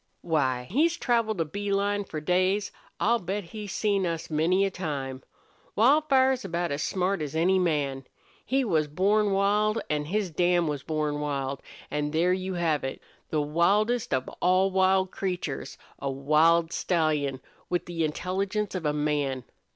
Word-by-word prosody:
"Why, 130 -6 0
he's 325 - +2
traveled 230 -5 0
a - - +1
bee 200 +6 -4
line 200 +1 0
for 155 - -5
days! 185 +5 +1 0.3
I'll 235 +2 +3
bet 195 +2 -3
he's 205 +3 -8
seen 200 -3 +1
us 165 -1 -4
many 175 +6 +2
a 195 - -1
time. 140 -7 -4 0.5
Wildfire's 265 +1 +4
about 175 -3 -2
as 140 +1 -2
smart 185 -1 0
as 150 0 -4
any 185 +4 +3
man. 145 -6 0 0.4
He 270 0 +1
was 160 -7 +1
born 200 +7 +2
wild, 210 +3 +2
an' 150 -1 0
his 195 +2 -1
dam 175 +1 +2
was 145 -2 -2
born 150 -1 -2
wild, 140 -2 -3 0.3
an' 150 0 -1
there 165 +4 +2
you 185 0 -3
have 165 -4 0
it. 135 - -4 0.3
The 150 -1 0
wildest 205 +10 +1
of 130 -1 0
all 185 +2 +3
wild 190 0 +3
creatures 180 -7 -4 0.2
a 140 - -2
wild 155 +5 +3
stallion, 150 -6 0 0.3
with 175 -1 -1
the 170 -2 -2
intelligence 195 +6 -2
of 180 -5 -2
a 150 - +1
man! 145 -3 -1
175 Hz, 160 wpm, -27 LUFS, 150-200 Hz, 0.5 s, Wildfire's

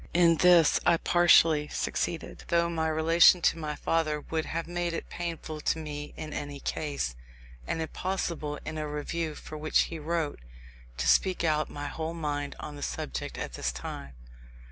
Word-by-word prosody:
In 170 -2 +5
this 175 -2 +6
I 170 -1 +4
partially 165 -3 +5
succeeded, 165 +2 -3
though 170 0 +2
my 160 -1 0
relation 165 +3 +6
to - - +3
my 150 -1 -3
father 155 -2 0
would 160 +1 -3
have 165 +1 -3
made 175 0 -2
it - - -5
painful 165 -3 -5
to 165 - +1
me 150 -2 -6
in 155 -1 -6
any 145 -1 -5
case, 140 - -3 0.5
and - - -1
impossible 165 -4 -3
in 160 0 -4
a 155 - -3
Review 155 +1 -3
for 155 +1 -8
which 155 0 +3
he 165 - -3
wrote, 160 -1 -2 0.6
to - - -1
speak 185 -2 +3
out 155 -2 +1
my 145 0 -6
whole 160 +2 -4
mind 145 -3 -3
on 150 - -7
the 145 - -9
subject 60 - -4
at - - -5
this 65 - -2
time. 65 +2 -7
160 Hz, 170 wpm, -29 LUFS, 150-170 Hz, 0.6 s, this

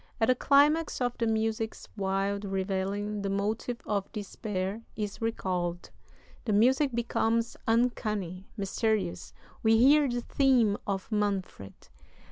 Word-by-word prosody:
At 225 - +2
the - - +7
climax 290 +5 +3
of 245 -1 0
the 230 - +1
music's 220 0 -1
wild 195 0 -1
revelling 195 +1 -2
the 200 - -2
motive 215 +4 -2
of 200 -2 -2
despair 205 0 -4
is 210 -1 -4
recalled; 180 -6 -2 0.5
the 215 - 0
music 260 +7 +4
becomes 230 -1 0
uncanny, 215 -6 0
mysterious; 200 -2 -1 0.3
we 225 0 +4
hear 280 +4 +5
the 240 0 -1
theme 245 -5 +3
of 195 +1 -3
Manfred. 195 - -3
215 Hz, 120 wpm, -29 LUFS, 195-235 Hz, 0.5 s, the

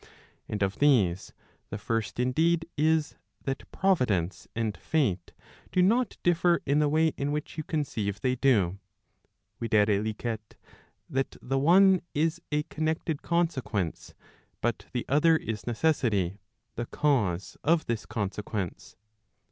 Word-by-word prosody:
And 105 -1 -1
of 95 0 -2
these, 105 -12 +3 0.4
the 105 - -4
first 115 +2 -2
indeed 165 +7 +2
is, 155 0 +1 0.3
that 135 -1 -4
Providence 110 - +1
and 110 -3 -1
Fate 95 - -1 0.4
do 180 - +3
not 235 +6 +2
differ 175 0 +3
in 145 +2 +2
the 150 -1 +3
way 160 +2 +3
in 140 +1 -1
which 150 0 -4
you 155 - -3
conceive 110 - -2
they 130 -1 +1
do, 100 -9 +2 0.8
viz. 115 - -3 1.4
that 135 0 -2
the 135 +1 -1
one 185 +5 +6
is 165 +3 +1
a 150 0 +1
connected 155 0 -2
consequence, 135 - -1 0.4
but 120 -1 -2
the 125 - -3
other 160 +3 +4
is 110 -7 -5
necessity, 110 - +1 0.3
the 120 0 -4
cause 105 -12 0
of 160 +1 +3
this 115 -2 -3
consequence. 100 -3 -4
135 Hz, 125 wpm, -28 LUFS, 105-160 Hz, 1.4 s, one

